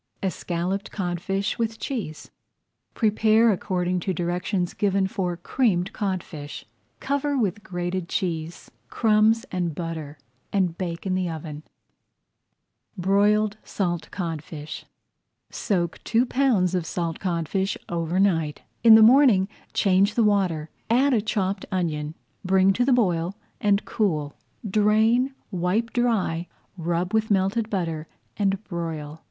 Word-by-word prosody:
ESCALLOPED 185 +1 -2
CODFISH 195 +2 -2
WITH 225 -1 -1
CHEESE 215 - -5 0.6
Prepare 220 +1 +4
according 180 -2 -1
to 185 +1 -2
directions 175 +2 -1
given 195 -1 +1
for 180 -2 -2
Creamed 185 -2 0
Codfish. 170 -7 -4 0.3
Cover 285 +1 -1
with 210 -4 0
grated 175 -1 -3
cheese, 165 -2 -3 0.2
crumbs, 220 +1 +3
and 175 -4 -2
butter, 160 -3 -5 0.3
and 185 -4 +1
bake 170 -1 -4
in 190 - 0
the 185 -1 0
oven. 155 -2 -6 1.4
[Page 180 - -6
101] 195 - +2 0.2
BROILED 210 0 +1
SALT 175 -4 -2
CODFISH 160 -3 -6 0.7
Soak 175 -5 -1
two 235 +2 +2
pounds 240 -10 +2
of 175 -3 -1
salt 170 -2 -3
codfish 190 +2 -1
over 170 +1 -1
night. 165 -7 +1 0.2
In 225 -2 +10
the 220 - +8
morning 235 -5 +6 0.2
change 195 +2 +3
the 235 - +3
water, 185 -7 +1 0.2
add 260 +4 +4
a 225 - +3
chopped 200 -2 -2
onion, 160 -4 -2 0.3
bring 190 +1 +4
to 245 - +1
the 265 - +2
boil, 185 -6 +1 0.2
and 205 0 +2
cool. 155 -10 -1 0.3
Drain, 220 +6 +3 0.2
wipe 185 +6 0
dry, 205 -9 0 0.3
rub 175 +2 -2
with 220 0 +1
melted 205 +3 +1
butter, 165 -6 -2 0.3
and 195 0 0
broil. 160 -4 -5
190 Hz, 125 wpm, -25 LUFS, 170-215 Hz, 1.4 s, In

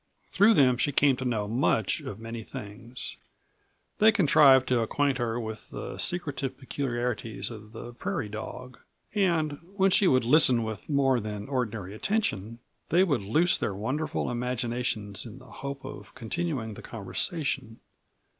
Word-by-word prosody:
Through 210 +3 +5
them 125 -3 +5
she 145 +3 +1
came 140 -1 +4
to 130 - -4
know 110 -4 0
much 110 -2 +1
of 100 - -7
many 115 0 -6
things. 115 0 -7 0.8
They 220 +1 +7
contrived 140 - +6
to 125 -2 +3
acquaint 135 +4 +1
her 120 -1 -1
with 110 -2 -6
the - - -6
secretive 140 -6 -1
peculiarities 120 -6 -3
of 110 -1 -10
the 120 +1 -8
prairie 115 - -3
dog, 125 +4 -7 0.3
and 165 -8 +1 0.2
when 195 -1 +3
she 195 - +4
would 130 -6 +3
listen 130 -3 +5
with 110 +3 -6
more 135 -3 +3
than 105 -1 -5
ordinary 115 -8 -2
attention 115 - -1 0.3
they 175 +3 +5
would 145 - +1
loose 155 - +2
their 100 - -1
wonderful 135 +8 -2
imaginations 120 -4 -2
in 115 0 -10
the 130 - -14 0.2
hope 140 -1 -5
of 140 +1 -9
continuing 125 -2 -3
the - - -10
conversation. 125 - -3
125 Hz, 150 wpm, -28 LUFS, 110-145 Hz, 0.8 s, They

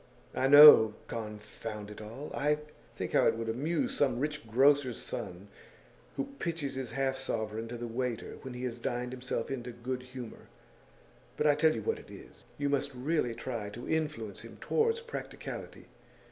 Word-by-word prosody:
'I 130 - +1
know, 140 -7 +10
confound 105 -1 -6
it 105 - -9
all! 115 +8 -8 0.6
Think - - -4
how - - +5
it - - +3
would 115 0 -4
amuse 150 +8 0
some 130 -4 +2
rich 150 -3 -3
grocer's 135 +1 +4
son 90 +3 -6 0.7
who - - -3
pitches 165 -5 -2
his 130 -2 -4
half 135 -1 0
sovereign 110 -3 -3
to 120 +1 -6
the 120 - -5
waiter 120 0 -3
when 130 -2 -7
he 125 - -6
has 120 -1 -3
dined 125 0 -2
himself 130 +1 -3
into 125 -2 -4
good 125 +2 -4
humour! 125 -2 -9 0.9
But 150 - 0
I 150 - +6
tell 155 +1 +3
you - - -4
what 450 - -1
it - - -15
is: - - -13
you 145 - 0
must 140 -1 0
really 125 -2 0
try 115 -5 -4
to 120 +4 -8
influence 150 -10 -2
him - - -11
towards 460 +1 +1
practicality. 470 0 -7
125 Hz, 170 wpm, -31 LUFS, 115-145 Hz, 0.9 s, know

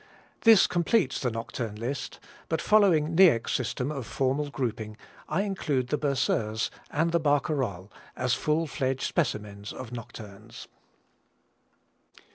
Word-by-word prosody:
This 225 -4 +7
completes 175 - +1
the 125 - +1
nocturne 115 -1 -5
list, 120 +6 -5 0.3
but 160 - 0
following 170 -7 +3
Niecks' 160 -11 +5
system 130 +2 -2
of 135 -6 -5
formal 140 +2 0
grouping 110 -5 -4 0.3
I 175 +6 +1
include 150 -11 -1
the 150 - +1
Berceuse 115 -6 0 0.2
and 160 +3 0
Barcarolle 145 - 0 0.2
as 125 -1 0
full 155 +2 +1
fledged 135 -3 -2
specimens 105 -9 -2
of 125 -3 -8
nocturnes. 110 -4 -10
135 Hz, 115 wpm, -27 LUFS, 115-155 Hz, 0.3 s, This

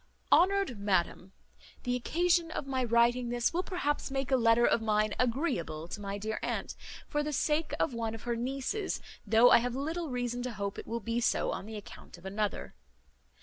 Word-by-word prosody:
"HONOURED 385 - +4
MADAM, 190 -2 0 0.5
"The 245 -1 0
occasion 335 +6 +1
of 320 - -4
my 260 -1 -1
writing 240 +1 +3
this 240 +3 0
will 350 - +1
perhaps 355 -7 -2
make 270 0 -2
a - - +6
letter 235 -1 +4
of - - +3
mine 215 -1 +1
agreeable 235 - -1
to 205 - -6
my 200 0 -4
dear 215 +2 -3
aunt, - - -3 0.3
for 295 - 0
the 300 0 -2
sake 300 +3 0
of - - +1
one 225 -1 -2
of 225 - -10
her 240 -1 -1
nieces, 270 - -2 0.3
though 235 +2 +6
I - - +8
have 245 +1 -2
little 320 +4 -3
reason 245 -1 -2
to 250 -1 -4
hope 200 -2 -4
it - - -9
will 230 +1 -3
be 230 +3 -1
so 240 - +1
on 200 - -5
the 220 -1 -6
account 205 - -11
of 175 - -16
another. 205 +2 -2
240 Hz, 195 wpm, -31 LUFS, 220-275 Hz, 0.5 s, I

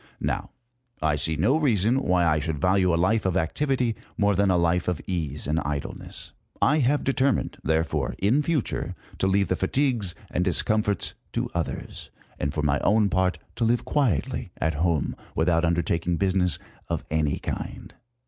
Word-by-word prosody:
Now, - - -2 0.5
I 80 -1 +1
see 75 +2 +1
no 110 - +3
reason 120 - +2
why 90 -7 +2
I 75 -2 +3
should 80 0 -2
value 90 +2 +3
a 85 - +2
life 105 +6 +2
of 95 -1 +1
activity 125 - 0 0.2
more 100 -1 +3
than 100 +1 +3
a 90 - +3
life 85 +1 +1
of 90 -4 0
ease 75 -6 -2
and 75 +3 +1
idleness. 75 -2 -5 0.3
I 150 +3 +3
have 145 +2 +2
determined, 135 -2 +1
therefore, 80 -4 0
in 115 +10 +3
future, 150 -4 -1 0.2
to 95 - +2
leave 100 +1 +2
the 95 - +1
fatigues 115 -1 0 0.2
and 90 - +1
discomforts 105 +3 +1 0.2
to - - -2
others, 85 -2 -4 0.3
and 70 - -1
for 75 - -2
my 70 -1 +2
own 105 -1 +3
part 95 0 +1 0.2
to 120 - 0
live 120 +1 +2
quietly 130 - 0
at 80 +1 0
home, 80 -1 0 0.2
without 85 0 +2
undertaking 85 0 +1
business 95 -2 +2 0.3
of - - -2
any 80 -2 +1
kind. - - -6
90 Hz, 165 wpm, -25 LUFS, 80-110 Hz, 0.5 s, no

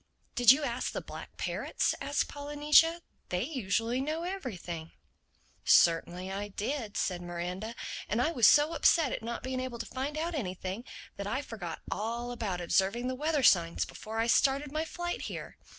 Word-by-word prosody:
"Did 245 -2 +4
you 290 +3 +3
ask 245 -1 -2
the - - -2
black - - -10
parrots?" - - -1
asked 285 +1 0
Polynesia. 295 +4 +3 0.3
"They 180 +2 0
usually 235 -2 -1
know 310 +4 -2
everything." 185 - -5 0.7
"Certainly 175 +2 +4
I 200 +1 -3
did," 215 +2 -3
said 180 -2 -1
Miranda. 180 +6 -5 0.3
"And 215 - +1
I 305 +7 +2
was 240 -9 +5
so 295 +2 +6
upset 320 -6 +4
at - - -3
not 235 +1 -5
being 260 0 -2
able 255 -2 -4
to 230 - -5
find 275 +4 -4
out 335 +2 -2
anything, 190 - -4 0.3
that 200 - -4
I 260 +7 -1
forgot 185 - -6
all 235 +3 -2
about 205 -7 -3
observing 195 +8 +1
the - - -1
weather 300 +1 0
signs 170 -6 +4
before 220 0 -8
I 225 - +2
started 275 +4 +3
my 310 +2 -1
flight 350 +1 -4
here. - - -7
240 Hz, 170 wpm, -30 LUFS, 195-290 Hz, 0.7 s, so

